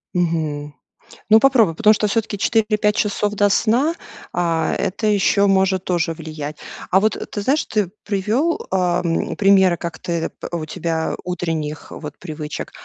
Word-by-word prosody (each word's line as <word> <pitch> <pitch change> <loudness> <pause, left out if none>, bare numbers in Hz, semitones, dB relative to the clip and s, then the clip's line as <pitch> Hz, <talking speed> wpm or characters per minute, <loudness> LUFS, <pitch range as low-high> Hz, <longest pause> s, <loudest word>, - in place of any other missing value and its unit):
Мгм, 155 -4 -1 0.5
ну, 220 +1 +8
попробуй, 230 -10 +4
потому 215 +6 +5
что 210 - 0
всё-таки 210 0 -1
4-5 210 -1 +2
часов, 210 -1 0
до 205 0 +3
сна, 245 +10 +2 0.4
а 170 -2 0
это 205 +4 -2
ещё 200 -1 +3
может 190 -1 +2
тоже 170 -2 0
влиять. 155 -2 -7 0.3
А 190 - +5
вот 215 +2 +2 0.2
ты 205 - -3
знаешь, 275 +9 +1
ты 205 -5 -1
привёл, 215 - 0
ам, 180 -2 0
примеры, 190 -3 +4
как 170 -2 -6
ты 170 -2 -3 0.2
у 170 -2 -3
тебя 160 0 -2
утренних 165 -4 -4
вот 150 -2 -8
привычек. 155 -3 -6
185 Hz, 145 wpm, -20 LUFS, 165-210 Hz, 0.5 s, ну